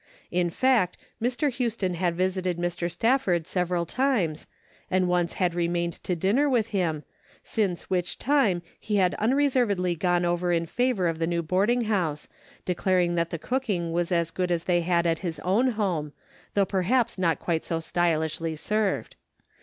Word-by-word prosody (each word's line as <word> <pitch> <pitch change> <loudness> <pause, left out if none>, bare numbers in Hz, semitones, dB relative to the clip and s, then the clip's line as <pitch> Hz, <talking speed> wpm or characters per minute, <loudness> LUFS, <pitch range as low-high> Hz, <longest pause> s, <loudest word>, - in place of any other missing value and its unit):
In 175 -1 +1
fact, 225 -3 +2 0.2
Mr. 255 +5 +1
Houston 230 -7 -1
had 175 0 0
visited 185 -1 0
Mr. 175 0 -2
Stafford 185 -3 +1
several 180 -1 -1
times, 200 - 0 0.4
and 185 -1 +2
once 175 -1 +1
had 180 -2 0
remained 170 0 0
to 180 - -1
dinner 210 - +2
with 230 -4 +1
him, 170 -7 -1 0.4
since 195 -6 -1
which 180 -1 -1
time 230 -11 +2 0.2
he 210 - -2
had 185 -3 +3
unreservedly 235 -7 +2
gone 175 +1 +1
over 175 +1 0
in 170 -1 +1
favor 245 -1 0
of 165 -1 -2
the 165 - 0
new 170 0 -1
boarding 200 +9 +2
house, 180 -10 -1 0.4
declaring 180 -1 +1
that 170 -1 0
the 165 - -3
cooking 200 - -2
was 170 +1 -1
as 170 -2 +1
good 180 -1 -1
as 170 -1 0
they 175 -1 +2
had 170 0 +1
at 165 -1 +1
his 170 -3 -4
own 205 +8 +2
home, 175 -9 -1 0.4
though 200 -1 +4
perhaps 210 +4 +1
not 170 -3 +2
quite 165 -2 -1
so 165 - -2
stylishly 165 -1 0
served. 210 +5 -1
180 Hz, 165 wpm, -26 LUFS, 170-210 Hz, 0.4 s, though